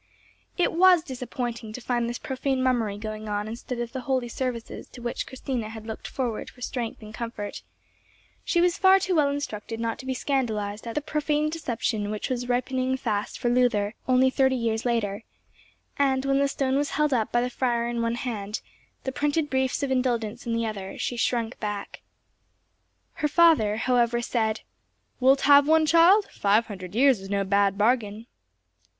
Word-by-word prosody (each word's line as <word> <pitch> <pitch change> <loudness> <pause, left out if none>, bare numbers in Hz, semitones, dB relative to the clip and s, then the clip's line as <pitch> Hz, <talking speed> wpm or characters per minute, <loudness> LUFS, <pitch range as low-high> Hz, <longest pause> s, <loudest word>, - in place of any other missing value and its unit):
It 355 - +2
was 355 -1 +6
disappointing 245 -4 -5
to 250 - -6
find 240 -1 -1
this 240 - -3
profane 265 0 -2
mummery 230 -6 +1
going 215 0 -6
on 205 0 -2
instead 235 +2 -6
of 240 -1 -3
the 260 - -5
holy 255 -2 -1
services 245 -2 -4
to - - -13
which 240 0 -4
Christina 255 -4 -4
had 220 -1 -9
looked 220 -1 -6
forward 240 -5 -3
for - - -19
strength 240 -2 -4
and 215 0 -10
comfort; 230 -3 -5 0.8
she 345 - +2
was 355 0 +2
far 385 0 +6
too 385 -1 -1
well 300 -4 +3
instructed 230 -6 -4
not 230 -1 -2
to 260 - -9
be 260 - -1
scandalized 220 -6 -2
at 230 - -5
the 300 - -1
profane 300 0 0
deception 230 -8 -2
which 215 +5 -3
was 245 -1 -2
ripening 255 +1 0
fast 215 -5 -2
for 245 - -2
Luther, 240 -4 +2
only 260 0 +4
thirty 265 0 +3
years 230 -2 -1
later; 225 -3 -1 0.8
and, 265 -1 +2
when 275 0 +2
the 280 - +3
stone 270 -1 0
was 285 0 0
held 300 -2 +1
up 225 -4 0
by 240 - +2
the 250 - -2
friar 240 -2 0
in 235 -1 -2
one 230 0 0
hand, 215 -4 -4 0.4
the 265 - -2
printed 295 +2 0
briefs 265 +1 0
of 275 - -1
indulgence 240 -3 -1
in 230 - 0
the 230 0 0
other, 195 -3 -5
she 245 - -2
shrunk 235 0 -1
back. 205 -2 -5 1.2
Her 300 - +3
father 295 -10 +4
however 240 0 +2
said, 220 -2 -1 0.6
"Wilt 265 +2 +4
have 285 0 +6
one, 315 0 +5
child? 340 +6 +5
Five 210 +3 +2
hundred 190 -3 -8
years 260 -2 +5
is 195 0 -10
no 200 0 +1
bad 200 0 +2
bargain." 215 -1 +1
245 Hz, 180 wpm, -26 LUFS, 220-270 Hz, 1.2 s, was